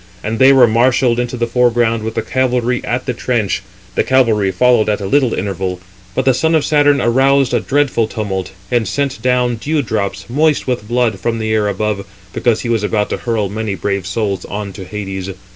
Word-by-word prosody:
And 110 +2 -3
they 130 - +7
365 135 - +6
were 115 -3 +5 0.3
marshalled 120 - -2
in 125 - 0
the 120 - +1
foreground 120 -1 +1
with 110 +1 -5
the 115 - -1
cavalry 125 -1 0
at 125 +1 -2
the 125 - -1
trench; 115 -5 -1 0.3
the - - +1
cavalry 115 -7 +2
followed 115 +2 +3
at 105 - 0
a 100 - -5
little 130 +3 +2
interval; 95 -1 -3 0.4
but 130 - 0
the 130 - +4
son 160 +6 +1
of 155 - +2
Saturn 145 -2 +3
aroused 135 +2 +2
a - - +3
dreadful 140 -5 +1
tumult, 95 -5 -4 0.2
and 120 -4 +1
sent 140 0 -2
down 125 -1 +1
dew 150 +5 -1
drops, 105 -3 -3
moist 150 +5 +1
with 125 -5 -2
blood, 120 -4 0
from 115 +4 -1
the 110 -1 -1
air 105 -1 +1
above, 100 0 -2 0.3
because 115 -2 +1
he - - -4
was 115 -2 +1
about 105 0 -1
to - - -1
hurl 115 -4 -1
many 105 0 -3
brave 100 -2 -2
souls 100 -2 -2
on 100 -1 -5
to 95 -1 -8
Hades. 95 -1 -5
115 Hz, 210 wpm, -16 LUFS, 105-125 Hz, 0.4 s, they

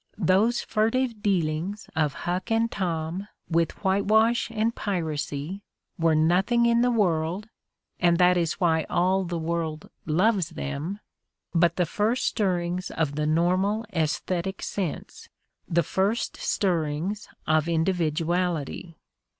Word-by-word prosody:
Those 205 +5 +3
furtive 225 +1 0
dealings 185 0 -1
of 150 -3 +1
Huck 180 +1 -2
and 225 0 +1
Tom 175 +1 -3 0.2
with 165 0 +2
whitewash 215 +5 +3
and 225 0 0
piracy 160 -2 -3 0.4
were 165 -1 +3
nothing 185 +10 +3
in 235 0 +4
the 245 - +3
world 185 -2 0 0.3
— - - -60
and 170 -1 +4
that 180 0 +5
is 170 -2 +1
why 160 -4 +1
aU 185 +2 +2
the 175 -1 -3
world 160 -1 -3 0.2
loves 185 +2 +2
them 160 +5 -4 0.3
— - - -27
^but 170 0 +4
the 180 - +2
first 215 +8 0
stirrings 180 -3 0
of 155 -3 -1
the 150 +1 -1
nor 170 +4 +2
mal 210 +3 0
aesthetic 175 +3 -1
sense, 185 -6 -4 0.4
the 170 0 +2
first 195 +9 0
stirrings 175 +2 -1 0.2
of 155 +1 +2
individuality. 170 -1 -1
180 Hz, 130 wpm, -26 LUFS, 160-205 Hz, 0.4 s, that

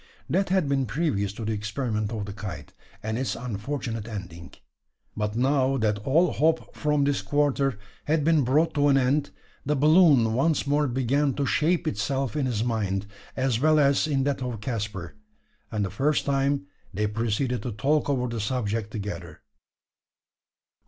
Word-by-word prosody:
That 190 +3 +1
had 185 -5 +2
been 135 -2 +1
previous 110 - 0
to 110 +1 -6
the 110 - -1
experiment 105 0 -2
of 110 -3 -3
the 100 - -7
kite, 95 -8 -7 0.3
and 110 +2 -2
its 130 - -1
unfortunate 115 -1 -4
ending. 90 -6 -8 0.6
But 105 0 -2
now 135 +2 +2
that 105 -3 0
all 155 - +2
hope 160 +2 0
from 150 -1 +1
this 140 0 +1
quarter 140 -4 +1 0.3
had 155 0 +1
been 160 -2 +3
brought 150 +7 +2
to 145 -1 +3
an 140 -1 +5
end, 135 +3 +1 0.3
the 150 +2 0
balloon 145 -6 +5
once 145 +6 +1
more 145 +1 +2
began 135 +2 +1
to 140 - 0
shape 170 +4 +1
itself 130 +1 -1
in 145 -3 0
his 115 -3 -1
mind, 100 -4 -1 0.3
as 130 -3 +1
well 155 +2 +4
as 140 +1 +3
in 140 -3 +1
that 140 -1 -1
of 125 -3 -3
Caspar; 105 -6 -4 0.6
and 105 -2 -1
for 95 - -1
the 95 - -14
first 150 +5 +1
time 140 -3 +1 0.3
they 105 +2 -1
proceeded 115 +4 -1
to 125 - -4
talk 145 +9 +1
over 125 -3 +1
the 115 -1 -4
subject 110 -2 -2
together. 90 -7 -6
130 Hz, 170 wpm, -26 LUFS, 105-145 Hz, 0.6 s, an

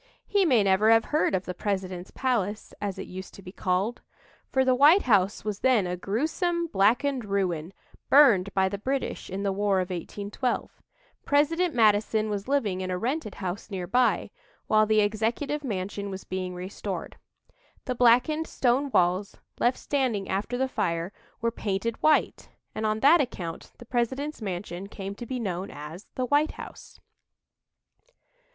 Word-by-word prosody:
He 405 -2 +2
may 250 -10 +4
never 195 +2 +3
have 225 0 +5
heard 305 -9 +2
of 185 - -2
"the 180 - -4
President's 185 -1 -3
Palace," 220 -6 -2
as 200 -2 -3
it - - -5
used 190 +1 -9
to 195 - -13
be 180 - -9
called 190 +5 -1 0.5
for 265 0 +2
the 260 - +4
White 295 +9 +6
House 200 -5 +2
was 210 -2 -3
then 250 -7 +3
a 180 0 -2
gruesome, 320 - -1
blackened 245 +2 +2
ruin, 185 -5 -1 0.4
burned 230 -10 +6
by 190 -1 +3
the 200 +1 -4
British 265 +5 -3
in 195 +2 -4
the 200 - +1
War 200 0 +1
of 185 0 -2
1812. 205 +7 -4 0.4
President 320 +4 +2
Madison 215 -1 +3
was 205 +1 -3
living 215 -10 0
in 185 - -3
a 180 - -1
rented 245 - -3
house 190 0 -5
nearby, 200 +7 +1 0.3
while 215 0 +3
the 215 0 +4
Executive 225 +8 -1
Mansion 200 -3 -3
was 190 0 -6
being 185 -1 -4
restored. 185 0 -6 0.7
The 255 - -1
blackened 250 +7 +3
stone 265 +3 +1
walls, 185 -2 +1 0.2
left 245 +1 +2
standing 250 -9 -1
after 200 +6 -2
the 265 +1 +1
fire, 170 -5 -2 0.3
were 230 0 +1
painted 220 +1 -3
white, 310 0 +2 0.2
and 215 0 -1
on 215 0 -1
that 310 +4 +6
account 175 -11 -5
the 240 - -12
President's 260 +5 -2
mansion 185 -1 -5
came 200 -1 -6
to 235 +4 -9
be 255 +1 -3
known 190 -4 -3
as 150 +6 -9
"the 255 - -1
White 290 +4 +2
House." - - -11
210 Hz, 160 wpm, -27 LUFS, 190-255 Hz, 0.7 s, White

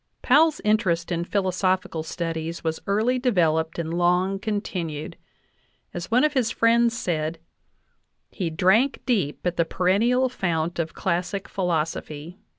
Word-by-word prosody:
Powell's 305 +4 +4
interest 210 -6 +1
in 170 0 -1
philosophical 185 -3 0
studies 165 0 -4
was 160 -1 -2
early 220 +6 +1
devel 175 -11 +2
oped 160 0 -10
and 165 -1 -3
long 180 +3 +2
continued; 180 -8 -4 0.8
as 175 0 -5
one 245 +4 +3
of 305 - +2
his 250 -5 +1
friends 230 0 +3
said: 160 -3 -2 0.9
"He 180 -5 -3
drank 190 - +2
deep 195 - -1
at 180 -1 -1
the 170 - +4
perennial 215 +10 +2
fount 170 -8 -2
of 165 -1 -3
classic 185 +2 -2
philosophy 165 -1 -3
180 Hz, 135 wpm, -24 LUFS, 165-220 Hz, 0.9 s, Powell's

